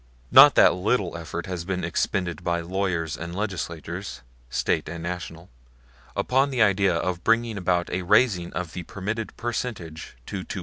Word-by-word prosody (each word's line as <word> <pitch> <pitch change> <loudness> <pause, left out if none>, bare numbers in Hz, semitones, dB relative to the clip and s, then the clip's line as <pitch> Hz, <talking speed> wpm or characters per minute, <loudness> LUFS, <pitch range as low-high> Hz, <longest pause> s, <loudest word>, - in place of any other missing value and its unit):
Not - - +9
a - - +8
little 90 0 0
effort 85 0 -5
has 90 -3 -4
been 90 0 -3
expended 90 0 -1
by 85 -1 0
lawyers 85 -3 -2
and 85 +2 -6
legislators 90 - -5 0.3
State 75 +5 0
and 85 0 -6
national 85 -1 -6 0.6
upon 135 +2 +2
the 125 -4 +3
idea 100 -3 +3
of 90 +1 -2
bringing 115 0 +2
about 90 -2 0
a 95 - -1
raising 95 -2 +3
of 90 -2 -4
the 90 - -4
permitted 105 +6 -5
percentage 110 - -5
to 95 -2 -5
2.75. - - -6
90 Hz, 160 wpm, -25 LUFS, 85-100 Hz, 0.6 s, Not